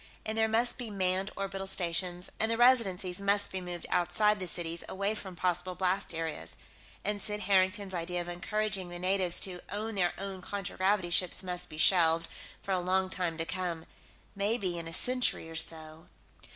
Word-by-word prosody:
And 220 Hz, -, -1 dB
there 220 Hz, 0 st, +3 dB
must 235 Hz, +3 st, +4 dB
be 240 Hz, -3 st, -5 dB
manned 190 Hz, -1 st, 0 dB
orbital 195 Hz, -1 st, -4 dB
stations, 180 Hz, 0 st, 0 dB
and 220 Hz, -, +2 dB
the 230 Hz, -, 0 dB
Residencies 200 Hz, -7 st, +3 dB
must 200 Hz, 0 st, +2 dB
be 190 Hz, -, -4 dB
moved 175 Hz, -1 st, -6 dB
outside 210 Hz, +4 st, +2 dB
the 185 Hz, -, -4 dB
cities, 170 Hz, -1 st, -3 dB
away 200 Hz, +2 st, 0 dB
from 190 Hz, -4 st, -6 dB
possible 180 Hz, +1 st, -1 dB
blast 185 Hz, -1 st, 0 dB
areas. 150 Hz, -, -5 dB, 0.5 s
And 205 Hz, 0 st, +1 dB
Sid 210 Hz, 0 st, -3 dB
Harrington's 190 Hz, 0 st, +2 dB
idea 175 Hz, 0 st, -2 dB
of 175 Hz, -, -5 dB
encouraging 195 Hz, +1 st, -1 dB
the 175 Hz, -, -7 dB
natives 185 Hz, -1 st, +3 dB
to 180 Hz, -2 st, -1 dB
own 215 Hz, +2 st, -3 dB
their 180 Hz, -3 st, +1 dB
own 195 Hz, -1 st, -5 dB
contragravity 190 Hz, -1 st, -1 dB
ships 180 Hz, +2 st, +2 dB
must 180 Hz, -1 st, 0 dB
be 155 Hz, -, -9 dB
shelved, 165 Hz, 0 st, +4 dB, 0.3 s
for 195 Hz, -, -4 dB
a 185 Hz, -, +2 dB
long 185 Hz, +1 st, 0 dB
time 175 Hz, -4 st, -2 dB
to 165 Hz, -, -1 dB
come. 175 Hz, -2 st, -3 dB, 0.5 s
Maybe, 200 Hz, -3 st, 0 dB
in 165 Hz, -, -7 dB
a -, -, -5 dB
century 250 Hz, -5 st, +1 dB
or 165 Hz, -, -9 dB
so.... 160 Hz, 0 st, -2 dB
185 Hz, 180 wpm, -30 LUFS, 175-200 Hz, 0.5 s, must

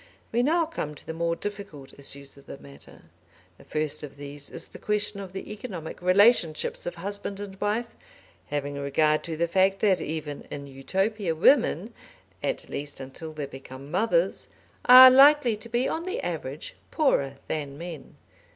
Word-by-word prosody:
We 235 Hz, -, +2 dB
now 325 Hz, +6 st, +2 dB
come 155 Hz, -, -5 dB
to -, -, -15 dB
the 160 Hz, -, -5 dB
more 170 Hz, +1 st, -1 dB
difficult 195 Hz, -9 st, -7 dB
issues 140 Hz, 0 st, -7 dB
of 140 Hz, -, -18 dB
the -, -, -8 dB
matter. 70 Hz, 0 st, -15 dB, 0.6 s
The -, -, -15 dB
first 155 Hz, -1 st, -2 dB
of 145 Hz, -2 st, -9 dB
these 145 Hz, 0 st, -7 dB
is -, -, -5 dB
the -, -, -13 dB
question 210 Hz, -1 st, 0 dB
of 195 Hz, -2 st, -7 dB
the 190 Hz, +2 st, -7 dB
economic 190 Hz, -8 st, -7 dB
relationships 185 Hz, -4 st, +3 dB
of 175 Hz, -, -4 dB
husband 200 Hz, +2 st, -4 dB
and 195 Hz, -1 st, -8 dB
wife, 220 Hz, +3 st, -1 dB, 0.5 s
having 145 Hz, -1 st, -3 dB
regard 150 Hz, +2 st, +2 dB
to 160 Hz, -2 st, -4 dB
the 170 Hz, +1 st, +1 dB
fact 190 Hz, +3 st, +3 dB
that 195 Hz, -3 st, +3 dB
even 150 Hz, -2 st, -5 dB
in 140 Hz, -, -6 dB
Utopia 190 Hz, +7 st, -2 dB
women, 225 Hz, -, +3 dB, 0.5 s
at -, -, -2 dB
least 145 Hz, 0 st, -5 dB
until 135 Hz, +5 st, -8 dB
they 150 Hz, -2 st, -5 dB
become 135 Hz, +1 st, -11 dB
mothers, 225 Hz, -, +1 dB, 0.4 s
are 255 Hz, +1 st, +11 dB
likely 275 Hz, -2 st, +6 dB
to 235 Hz, +2 st, -11 dB
be 240 Hz, +3 st, +1 dB
on 330 Hz, +2 st, -3 dB
the 390 Hz, +6 st, -3 dB
average -, -, -5 dB, 0.2 s
poorer 140 Hz, -, +1 dB
than 145 Hz, -3 st, -4 dB
men. 165 Hz, -4 st, -8 dB
175 Hz, 170 wpm, -26 LUFS, 145-215 Hz, 0.6 s, are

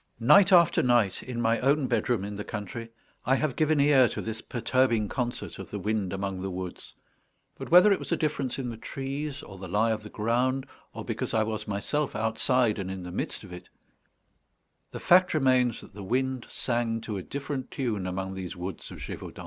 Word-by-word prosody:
Night 190 Hz, -, +6 dB
after 170 Hz, -2 st, +6 dB
night, 120 Hz, -6 st, +2 dB
in 125 Hz, -2 st, -5 dB
my 115 Hz, 0 st, +2 dB
own 140 Hz, +2 st, +2 dB
bedroom 120 Hz, -3 st, 0 dB
in 105 Hz, 0 st, -5 dB
the 105 Hz, -, -4 dB
country, 110 Hz, +3 st, -6 dB, 0.3 s
I 130 Hz, -, +3 dB
have 145 Hz, -1 st, -1 dB
given 155 Hz, -1 st, +2 dB
ear 140 Hz, -4 st, +5 dB
to -, -, -5 dB
this 110 Hz, 0 st, -4 dB
perturbing 120 Hz, -3 st, +1 dB
concert 120 Hz, -2 st, -4 dB
of -, -, -8 dB
the -, -, -4 dB
wind 105 Hz, -3 st, -1 dB
among 95 Hz, -1 st, -3 dB
the 95 Hz, -, -3 dB
woods, 90 Hz, -1 st, -7 dB, 0.6 s
but -, -, -8 dB
whether 180 Hz, +5 st, +8 dB
it 195 Hz, -, +3 dB
was -, -, -7 dB
a 170 Hz, -, +2 dB
difference 140 Hz, -5 st, -1 dB
in 130 Hz, -3 st, -3 dB
the 115 Hz, -, -8 dB
trees, 140 Hz, +3 st, -5 dB
or 95 Hz, -2 st, -11 dB
the 95 Hz, -, -7 dB
lie 105 Hz, +5 st, +2 dB
of 110 Hz, -, -2 dB
the 105 Hz, -, -10 dB
ground, 125 Hz, +5 st, 0 dB, 0.3 s
or -, -, -7 dB
because -, -, -3 dB
I 110 Hz, -, +3 dB
was 110 Hz, -1 st, -4 dB
myself 130 Hz, +9 st, -1 dB
outside 115 Hz, 0 st, +1 dB
and 95 Hz, -1 st, -4 dB
in 95 Hz, -1 st, -5 dB
the 90 Hz, -, -7 dB
midst 90 Hz, -, -3 dB
of 95 Hz, -3 st, -11 dB
it, 90 Hz, 0 st, -10 dB, 1.2 s
the -, -, -7 dB
fact 180 Hz, -1 st, +5 dB
remains 130 Hz, -5 st, +3 dB
that -, -, -15 dB
the 100 Hz, -, -9 dB
wind 130 Hz, +5 st, -1 dB
sang 120 Hz, -2 st, -1 dB
to 105 Hz, -2 st, -4 dB
a -, -, -4 dB
different 140 Hz, +4 st, -5 dB
tune 110 Hz, -8 st, -2 dB
among 95 Hz, +1 st, -3 dB
these 95 Hz, -2 st, -6 dB
woods 90 Hz, 0 st, -6 dB
of -, -, -9 dB
Gévaudan. -, -, -8 dB
115 Hz, 205 wpm, -28 LUFS, 100-135 Hz, 1.2 s, whether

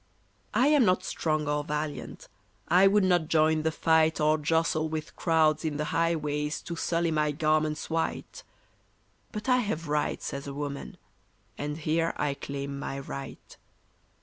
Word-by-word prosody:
I 250 Hz, -, +4 dB
am 295 Hz, -3 st, +5 dB
not 185 Hz, -3 st, +2 dB
strong 155 Hz, -4 st, -1 dB
or 150 Hz, 0 st, 0 dB
valiant, 150 Hz, 0 st, -5 dB, 0.4 s
I 180 Hz, +4 st, +6 dB
would 205 Hz, +1 st, +4 dB
not 175 Hz, -4 st, +2 dB
join 155 Hz, 0 st, +3 dB
the 160 Hz, +1 st, 0 dB
fight 160 Hz, 0 st, +2 dB
Or 155 Hz, +1 st, +3 dB
jostle 160 Hz, +1 st, +1 dB
with 155 Hz, 0 st, -5 dB
crowds 160 Hz, -2 st, +2 dB
in 155 Hz, -2 st, -2 dB
the 150 Hz, -, -1 dB
highways 150 Hz, -3 st, 0 dB
To 170 Hz, -, -5 dB
sully 170 Hz, 0 st, 0 dB
my 150 Hz, -1 st, +1 dB
garments 155 Hz, +1 st, 0 dB
white; 165 Hz, 0 st, -3 dB, 0.9 s
But 210 Hz, +4 st, -6 dB
I 250 Hz, -1 st, +5 dB
have 200 Hz, -9 st, -2 dB
rights 150 Hz, 0 st, -1 dB
as 140 Hz, 0 st, -5 dB
a 140 Hz, -, -6 dB
woman, 140 Hz, -1 st, -5 dB, 0.6 s
and 150 Hz, +3 st, -4 dB
here 165 Hz, +1 st, 0 dB
I 140 Hz, -, 0 dB
claim 140 Hz, 0 st, -5 dB
my 135 Hz, -, -4 dB
right. 135 Hz, 0 st, -8 dB
155 Hz, 155 wpm, -28 LUFS, 150-165 Hz, 0.9 s, I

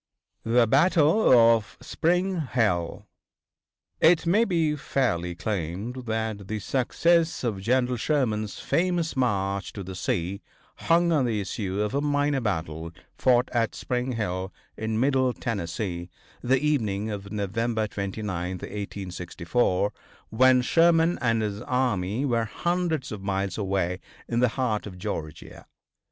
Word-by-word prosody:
THE 115 Hz, +1 st, +4 dB
BATTLE 160 Hz, -, +4 dB
OF 115 Hz, -3 st, +5 dB
SPRING 180 Hz, +1 st, 0 dB
HILL. 95 Hz, -9 st, 0 dB, 0.9 s
It 165 Hz, +1 st, +5 dB
may 205 Hz, +7 st, +4 dB
be 165 Hz, -6 st, +1 dB
fairly 90 Hz, -, -1 dB
claimed 105 Hz, +7 st, -4 dB
that 110 Hz, -3 st, -3 dB
the 110 Hz, -, -3 dB
success 160 Hz, -, +1 dB
of 105 Hz, -6 st, -2 dB
General 125 Hz, +3 st, +1 dB
Sherman's 110 Hz, -6 st, 0 dB
famous 175 Hz, -2 st, 0 dB
March 100 Hz, -6 st, 0 dB
to 100 Hz, -, -6 dB
the 95 Hz, +1 st, -7 dB
Sea 90 Hz, +1 st, -2 dB, 0.5 s
hung 170 Hz, +1 st, +4 dB
on 145 Hz, -5 st, +3 dB
the 110 Hz, -3 st, 0 dB
issue 100 Hz, -1 st, -3 dB
of 105 Hz, +3 st, -1 dB
a 140 Hz, -, +1 dB
minor 145 Hz, -1 st, +1 dB
battle 80 Hz, -6 st, -3 dB, 0.2 s
fought 125 Hz, -1 st, +3 dB
at 115 Hz, -2 st, 0 dB
Spring 125 Hz, 0 st, -2 dB
Hill, 95 Hz, -4 st, -3 dB, 0.2 s
in 110 Hz, 0 st, -2 dB
Middle 130 Hz, -1 st, +2 dB
Tennessee, 90 Hz, -5 st, -4 dB, 0.3 s
the 130 Hz, +2 st, +2 dB
evening 110 Hz, -8 st, 0 dB
of 100 Hz, -1 st, -6 dB
November 110 Hz, +2 st, -1 dB
29th, 95 Hz, -3 st, -4 dB
1864, 95 Hz, 0 st, -2 dB, 0.4 s
when 125 Hz, +2 st, +5 dB
Sherman 165 Hz, +3 st, +3 dB
and 115 Hz, -2 st, +1 dB
his 105 Hz, 0 st, -3 dB
army 120 Hz, -2 st, 0 dB
were 115 Hz, -4 st, +1 dB
hundreds 170 Hz, +1 st, -1 dB
of 105 Hz, -2 st, -6 dB
miles 95 Hz, -1 st, -2 dB
away 95 Hz, -3 st, -1 dB, 0.3 s
in 120 Hz, -, 0 dB
the 125 Hz, 0 st, +4 dB
heart 110 Hz, -5 st, 0 dB
of 90 Hz, -3 st, -9 dB
Georgia. 80 Hz, -6 st, -6 dB
115 Hz, 130 wpm, -26 LUFS, 100-135 Hz, 0.9 s, OF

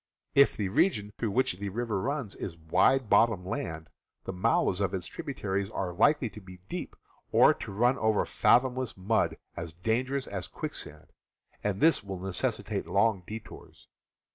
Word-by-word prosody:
If 140 Hz, 0 st, +5 dB
the 100 Hz, -3 st, -1 dB
region 105 Hz, -, +1 dB
through 115 Hz, -, 0 dB
which 100 Hz, -3 st, 0 dB
the 100 Hz, 0 st, -3 dB
river 110 Hz, -1 st, -2 dB
runs 135 Hz, -5 st, -3 dB
is 85 Hz, -3 st, -6 dB
wide 115 Hz, +11 st, +3 dB
bottom 105 Hz, -4 st, +3 dB
land, 80 Hz, -3 st, -4 dB, 0.4 s
the -, -, -5 dB
mouths 90 Hz, +1 st, +1 dB
of 100 Hz, -1 st, 0 dB
its 90 Hz, -2 st, -4 dB
tribu 140 Hz, -, -6 dB
taries 95 Hz, -2 st, -2 dB
are 90 Hz, -4 st, -3 dB
likely 125 Hz, -, +3 dB
to 105 Hz, -, -11 dB
be 95 Hz, -1 st, -12 dB
deep, -, -, -5 dB, 0.4 s
or -, -, +6 dB
to -, -, -8 dB
run 120 Hz, +6 st, +2 dB
over 110 Hz, -1 st, +2 dB
fathomless 130 Hz, -1 st, +2 dB
mud 105 Hz, +4 st, +1 dB, 0.2 s
as 85 Hz, -1 st, -6 dB
dangerous 125 Hz, +9 st, -1 dB
as 95 Hz, -2 st, -5 dB
quicksand, -, -, -7 dB, 0.5 s
and 105 Hz, -2 st, -1 dB
this 160 Hz, -7 st, +4 dB
will 95 Hz, -2 st, -5 dB
neces 95 Hz, 0 st, -1 dB
sitate -, -, -4 dB
long 100 Hz, -1 st, +2 dB
detours. 110 Hz, +1 st, -10 dB
100 Hz, 165 wpm, -29 LUFS, 95-120 Hz, 0.5 s, or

